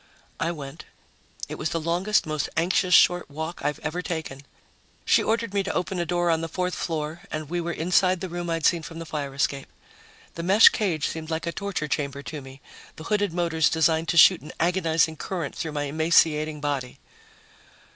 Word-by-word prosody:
I 165 - 0
went. 150 -1 -8 0.6
It - - -7
was 155 - -1
the 165 - -2
longest, 175 +6 +1
most 155 -2 -2
anxious 180 +2 +3
short 175 -3 +4
walk 160 +4 -6
I've 145 0 -1
ever 160 +3 -2
taken. 160 -6 -5 0.6
She - - +4
ordered 225 -2 -1
me 200 - +2
to 195 +1 -3
open 180 0 -2
a 170 - -1
door 175 -1 +1
on 165 0 +1
the 165 - -3
fourth 180 +2 -2
floor, 160 0 -3
and 155 0 -5
we 175 0 -1
were 170 0 -3
inside 180 +2 +2
the 185 - -4
room 175 0 -5
I'd 165 -2 -1
seen 170 -2 +3
from 165 +1 -9
the 165 - -6
fire 145 -3 -5
escape. 140 -1 -1 0.7
The 170 - -6
mesh 195 +6 +7
cage 170 -9 -1
seemed 160 0 -6
like 160 +1 -2
a 170 - -1
torture 195 -5 -3
chamber 140 -1 -3
to 150 -1 -6
me, 135 0 -13 0.3
the 155 - -10
hooded 205 +1 0
motors 165 -2 +1
designed 160 0 +2
to 170 - 0
shoot 180 +2 +7
an 150 - -10
agonizing 165 -2 +1
current 170 -5 -4
through 160 -2 -4
my 145 -1 -2
emaciating 155 0 +2
body. 140 -4 -3
165 Hz, 195 wpm, -25 LUFS, 155-175 Hz, 0.7 s, mesh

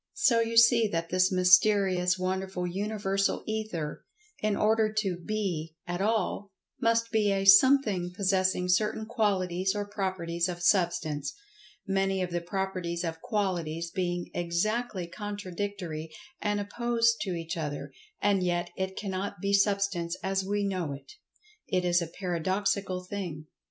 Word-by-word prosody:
So 240 -12 +4
you 230 0 0
see 230 -1 +6
that 165 -3 -2
this 185 +1 +3
mysterious, 185 0 +4
wonderful 185 0 -2
Universal 195 +1 -1
Ether—in 215 - -4
order 215 +1 +2
to 200 -5 0
"be" 175 -5 -3
at 175 +1 -3
all—must 225 +2 -1
be 215 -3 +2
a 195 0 0
"Something" 195 -4 +6
possessing 185 -1 +1
certain 210 +4 +1
qualities 190 -4 0
or 205 0 -2
properties 185 -4 -2
of 175 -1 -5
Substance—many 195 - -1
of 180 - -4
the 175 0 -1
properties 180 -1 -3
of 165 -1 -4
qualities 170 -6 -2
being 175 -2 -2
exactly 185 +4 -1
contradictory 190 -4 -5 0.3
and 205 0 0
opposed 230 +2 +1
to 185 -4 -2
each 165 -1 -4
other—and 195 - -2
yet 175 -1 -1
it 190 0 -3
cannot 195 -2 -4
be 200 +2 -1
Substance 200 -4 +1
as 195 0 0
we 205 +1 -1
know 185 -7 -2
it. 140 - -11 0.6
It 180 -1 0
is 175 0 +3
a 170 - -3
Paradoxical 185 +2 -1
thing. 180 -5 -5
190 Hz, 130 wpm, -29 LUFS, 175-210 Hz, 0.6 s, see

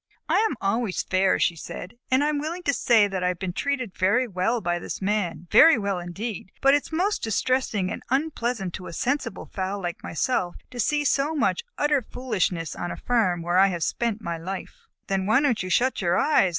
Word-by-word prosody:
"I - - +3
am - - -5
always 200 0 0
fair," 185 +1 +2
she 175 - +1
said, 180 +4 -8 0.2
"and 260 +2 +3
I 295 - +2
am 300 -1 0
willing 330 +4 -4
to 280 - +1
say 225 -5 +4
that 190 -2 -3
I - - +2
have 180 -1 -1
been 180 0 -4
treated 255 -4 -2
very 230 +8 +2
well 200 +4 0
by 175 -4 -1
this - - -5
Man, 195 -4 -1
very 325 0 +8
well 200 -3 -1
indeed, 195 +3 -6
but 275 0 +5
it 290 - +4
is - - -13
most 370 +6 0
distressing 220 -3 0
and - - -5
unpleasant 245 - -1
to 185 - -7
a - - -8
sensible 250 - -2
fowl 190 +1 -3
like 175 -3 -4
myself 175 0 -1
to - - -15
have - - -40
to 245 - -8
see 295 +6 +1
so 285 +3 +1
much 395 +9 +1
utter 295 -2 +2
foolishness 190 -10 -2
on 175 - -4
a - - -5
farm 185 -9 +1
where 175 +2 +2
I 195 - +7
have 175 -4 -2
spent 225 -2 -1
my 170 -1 -3
life." 195 - -7 0.2
"Then 195 -1 -1
why 220 +4 +5
don't 275 -6 +1
you 185 - -4
shut 255 +6 +2
your 175 -1 +2
eyes?" 295 -11 +4
210 Hz, 225 wpm, -25 LUFS, 185-260 Hz, 0.2 s, very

